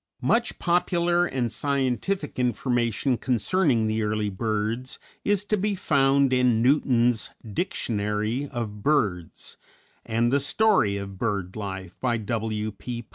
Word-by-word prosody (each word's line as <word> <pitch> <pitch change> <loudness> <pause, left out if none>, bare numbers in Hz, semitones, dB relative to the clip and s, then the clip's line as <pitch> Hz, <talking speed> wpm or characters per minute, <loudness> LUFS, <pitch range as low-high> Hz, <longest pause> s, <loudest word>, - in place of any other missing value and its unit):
Much 235 +1 +1
popular 175 0 +2
and 125 -5 -2
scientific 140 +5 -1
information 120 +1 0
concerning 130 - +1
the 110 0 0
early 105 -1 -1
birds 110 +4 -2 0.3
is 205 -1 +1
to 215 - +1
be 205 0 0
found 140 -5 +3
in 125 -3 +3
Newton's 125 -2 +2 0.2
"Dictionary 105 - -2
of 105 -4 -5
Birds," 100 - -1 0.5
and 115 +2 0
"The 140 - +4
Story 140 - +2
of 100 -1 -7
Bird 100 -5 -2
Life," 95 -4 -6
by 120 -2 0
W. 110 0 -2
P. 120 +3 -7
120 Hz, 125 wpm, -25 LUFS, 105-140 Hz, 0.5 s, The